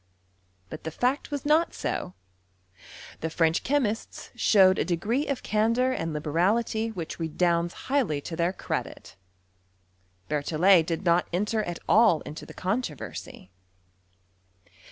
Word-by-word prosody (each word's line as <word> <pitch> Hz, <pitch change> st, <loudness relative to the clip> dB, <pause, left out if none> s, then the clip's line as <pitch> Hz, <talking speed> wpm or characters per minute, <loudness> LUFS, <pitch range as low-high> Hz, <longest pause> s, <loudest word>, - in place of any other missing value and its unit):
But 155 Hz, -, -8 dB
the 160 Hz, -, -3 dB
fact 250 Hz, -, -1 dB
was 290 Hz, 0 st, -4 dB
not 310 Hz, +3 st, +2 dB
so: 90 Hz, -, -3 dB, 1.0 s
the 160 Hz, -, -3 dB
French 165 Hz, +1 st, +1 dB
chemists 240 Hz, -6 st, -2 dB
showed 190 Hz, -3 st, +5 dB
a -, -, +2 dB
de~ 175 Hz, -, 0 dB
gree 235 Hz, -, -1 dB
of 275 Hz, -3 st, -3 dB
candour 230 Hz, +5 st, +2 dB
and 165 Hz, -10 st, -2 dB
liberality 195 Hz, +9 st, 0 dB
which 175 Hz, -8 st, -6 dB
redounds 170 Hz, +1 st, 0 dB
highly 260 Hz, -, +1 dB
to 165 Hz, -, -6 dB
their 170 Hz, +2 st, +1 dB
credit. 185 Hz, -, -5 dB, 1.1 s
Bettiiollet 160 Hz, +4 st, +3 dB
did 170 Hz, +3 st, -3 dB
not 170 Hz, +1 st, +3 dB
enter 210 Hz, +5 st, 0 dB
at 175 Hz, -1 st, -4 dB
all 215 Hz, -8 st, +5 dB
into 150 Hz, -, -9 dB
the -, -, -11 dB
controversy. 185 Hz, -, -4 dB
185 Hz, 130 wpm, -27 LUFS, 165-230 Hz, 1.1 s, showed